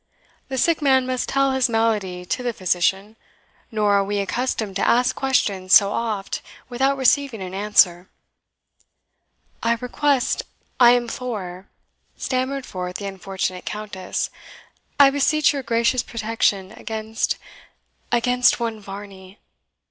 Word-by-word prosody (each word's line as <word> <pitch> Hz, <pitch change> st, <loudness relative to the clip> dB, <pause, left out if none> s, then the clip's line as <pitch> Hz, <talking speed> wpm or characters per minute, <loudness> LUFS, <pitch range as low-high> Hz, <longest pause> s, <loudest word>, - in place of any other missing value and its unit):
"The 265 Hz, -, -4 dB
sick 325 Hz, +5 st, +2 dB
man 265 Hz, -3 st, +3 dB
must 255 Hz, -1 st, -2 dB
tell 275 Hz, 0 st, +2 dB
his 265 Hz, -2 st, +1 dB
malady 210 Hz, -6 st, 0 dB
to 250 Hz, -, -2 dB
the 245 Hz, -1 st, -2 dB
physician; 190 Hz, +3 st, 0 dB, 0.5 s
nor 210 Hz, -2 st, +1 dB
are 200 Hz, 0 st, +4 dB
WE 205 Hz, +1 st, -2 dB
accustomed 210 Hz, 0 st, -2 dB
to -, -, 0 dB
ask 245 Hz, +1 st, +3 dB
questions 200 Hz, -8 st, +2 dB
so 200 Hz, -1 st, +6 dB
oft 215 Hz, -4 st, -3 dB, 0.3 s
without 265 Hz, +3 st, +1 dB
receiving 270 Hz, -2 st, +2 dB
an 185 Hz, -1 st, -6 dB
answer." 190 Hz, -3 st, +3 dB, 1.5 s
"I 230 Hz, 0 st, +2 dB
request 265 Hz, +1 st, 0 dB, 0.4 s
I 240 Hz, -1 st, +8 dB
implore," 225 Hz, -6 st, -3 dB, 0.5 s
stammered 260 Hz, +1 st, -2 dB
forth 180 Hz, -1 st, -6 dB
the 200 Hz, -, -5 dB
unfortunate 190 Hz, -1 st, -4 dB
Countess 210 Hz, -3 st, -4 dB, 0.7 s
"I 275 Hz, -1 st, +8 dB
beseech 295 Hz, +2 st, +2 dB
your 280 Hz, -, -3 dB
gracious 235 Hz, +1 st, +1 dB
protection 215 Hz, -4 st, -1 dB
against 220 Hz, -1 st, -3 dB, 0.7 s
against 245 Hz, +1 st, +3 dB
one 230 Hz, -2 st, -3 dB
Varney." 195 Hz, -1 st, -10 dB
225 Hz, 125 wpm, -22 LUFS, 195-255 Hz, 1.5 s, I